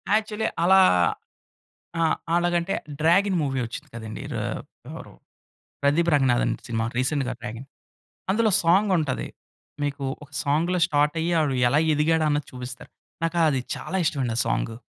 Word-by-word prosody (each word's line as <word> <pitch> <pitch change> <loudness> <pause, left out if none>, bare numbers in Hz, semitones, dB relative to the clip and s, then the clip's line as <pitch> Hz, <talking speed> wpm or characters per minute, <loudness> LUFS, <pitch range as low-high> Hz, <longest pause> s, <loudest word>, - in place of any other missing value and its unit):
Actually 215 0 -1 0.2
అలా 190 +2 +6 1.2
ఆ! - - +2 0.3
అలాగంటే 175 +1 +1 0.2
'డ్రాగన్' 185 +4 +3
మూవీ 135 -2 -1
వచ్చింది 115 - -8
కదండి. 110 -2 -7
రా - - -2 0.5
ఎవరు - - -9 0.7
ప్రదీప్ 160 +5 +3
రంగనాథన్ 130 -4 +2
సినిమా 115 -2 -1
రీసెంట్‌గా 130 0 0
'డ్రాగన్.' 120 +3 -7 0.6
అందులో 220 +2 +2
సాంగ్ 190 +5 +3
ఉంటది. 145 -6 -2 0.6
మీకు 145 -1 -3 0.2
ఒక 145 - -16
సాంగ్‌లో 165 +6 +1
స్టార్ట్ 150 +1 +1
అయ్యి. 170 +2 -1
ఆడు 145 -3 0
ఎలా 140 +5 +3
ఎదిగాడు 160 +2 +2
అన్నది 145 -1 0
చూపిస్తారు. 125 0 -9 0.3
నాకు 165 +1 -1
అది 135 -3 0 0.2
చాలా 135 +8 -4
ఇష్టం 150 - 0
అండి. 115 -3 -2
ఆ - - +4
సాంగు. 115 0 -1
150 Hz, 140 wpm, -24 LUFS, 130-175 Hz, 1.2 s, అలా